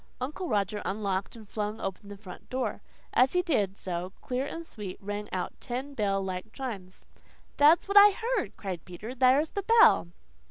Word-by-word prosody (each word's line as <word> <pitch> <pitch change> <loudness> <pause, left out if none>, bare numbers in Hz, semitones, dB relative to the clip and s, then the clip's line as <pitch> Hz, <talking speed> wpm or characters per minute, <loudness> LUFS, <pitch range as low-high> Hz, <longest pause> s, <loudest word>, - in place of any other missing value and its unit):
Uncle 300 +8 -4
Roger 205 0 0
unlocked 195 -1 -2
and 220 -2 -12
flung 210 +1 -3
open 195 +1 -5
the 205 - -8
front 195 -2 -12
door. 260 0 -2 0.3
As 255 +2 +4
he 360 0 +2
did 210 - 0
so, 180 +1 -4
clear 255 +2 -2
and 330 +2 -6
sweet, 205 -10 -7
rang 205 +1 -5
out 185 - -3
ten 265 +3 -4
bell 195 -5 0
like 185 +3 -5
chimes. 205 -9 -7 0.5
"That's 300 +6 +6
what 400 +1 +3
I 405 +1 +11
heard," 465 +5 -2
cried 185 -5 -5
Peter. 200 +7 -8
"There's 265 +4 +3
the 400 - -2
bell!" 455 - +6
215 Hz, 175 wpm, -29 LUFS, 195-285 Hz, 0.5 s, I